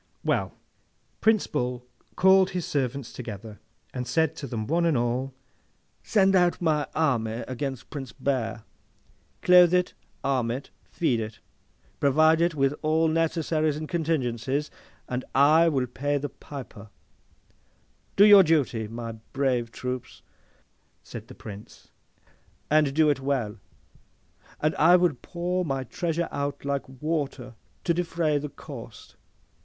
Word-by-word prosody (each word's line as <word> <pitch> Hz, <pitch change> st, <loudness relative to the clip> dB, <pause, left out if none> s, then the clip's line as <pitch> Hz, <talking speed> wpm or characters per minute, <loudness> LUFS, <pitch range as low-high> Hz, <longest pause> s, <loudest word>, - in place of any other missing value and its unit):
Well; -, -, 0 dB, 0.6 s
Prince 220 Hz, -2 st, +3 dB
Bull 125 Hz, -3 st, -3 dB, 0.3 s
called 190 Hz, 0 st, +5 dB
his 180 Hz, -2 st, -3 dB
servants 135 Hz, -2 st, -2 dB
together, 110 Hz, -3 st, -8 dB, 0.3 s
and 125 Hz, -1 st, -4 dB
said 160 Hz, +4 st, +1 dB
to 140 Hz, -, -6 dB
them 115 Hz, -3 st, -4 dB
one 170 Hz, +7 st, +1 dB
and 165 Hz, -5 st, +2 dB
all, 120 Hz, +3 st, -1 dB, 0.7 s
'Send 195 Hz, -2 st, +3 dB
out 175 Hz, -1 st, +3 dB
my 155 Hz, -4 st, +1 dB
army 120 Hz, -7 st, 0 dB
against 130 Hz, -1 st, -5 dB
Prince 135 Hz, -4 st, -6 dB
Bear. 120 Hz, -5 st, -2 dB, 0.8 s
Clothe 180 Hz, -1 st, +7 dB
it, 180 Hz, 0 st, +1 dB, 0.3 s
arm 130 Hz, -4 st, 0 dB
it, 130 Hz, +4 st, -5 dB, 0.2 s
feed 145 Hz, -9 st, 0 dB
it, 110 Hz, 0 st, -6 dB, 0.6 s
provide 155 Hz, +3 st, +4 dB
it 170 Hz, -1 st, +2 dB
with 135 Hz, -1 st, +2 dB
all 160 Hz, +1 st, +2 dB
necessaries 155 Hz, -2 st, 0 dB
and 155 Hz, 0 st, -5 dB
contingencies, 145 Hz, -5 st, -1 dB, 0.4 s
and 125 Hz, 0 st, -3 dB
I 155 Hz, +5 st, +6 dB
will 135 Hz, -5 st, 0 dB
pay 145 Hz, +4 st, -2 dB
the 145 Hz, +1 st, -3 dB
piper! 120 Hz, -7 st, -10 dB, 1.3 s
Do 200 Hz, -, +7 dB
your 205 Hz, -2 st, +9 dB
duty 145 Hz, -, +1 dB
by 110 Hz, -, -12 dB
my 115 Hz, -1 st, -5 dB, 0.2 s
brave 130 Hz, -4 st, 0 dB
troops,' 125 Hz, 0 st, -6 dB, 0.8 s
said -, -, -9 dB
the -, -, -12 dB
Prince, 105 Hz, -1 st, -11 dB, 0.8 s
'and 155 Hz, -2 st, +4 dB
do 155 Hz, -1 st, +5 dB
it 145 Hz, -, -2 dB
well, 130 Hz, -6 st, -2 dB, 1.0 s
and 155 Hz, +1 st, +1 dB
I 170 Hz, +4 st, +6 dB
will 175 Hz, -3 st, +3 dB
pour 180 Hz, +1 st, -2 dB
my 135 Hz, -5 st, -2 dB
treasure 170 Hz, +6 st, -2 dB
out 140 Hz, 0 st, -3 dB
like 140 Hz, -2 st, -2 dB
water, 135 Hz, -3 st, -3 dB, 0.3 s
to 170 Hz, -, +2 dB
defray 165 Hz, -3 st, 0 dB
the 150 Hz, +1 st, -5 dB
cost. 120 Hz, -8 st, -11 dB
145 Hz, 135 wpm, -26 LUFS, 125-165 Hz, 1.3 s, your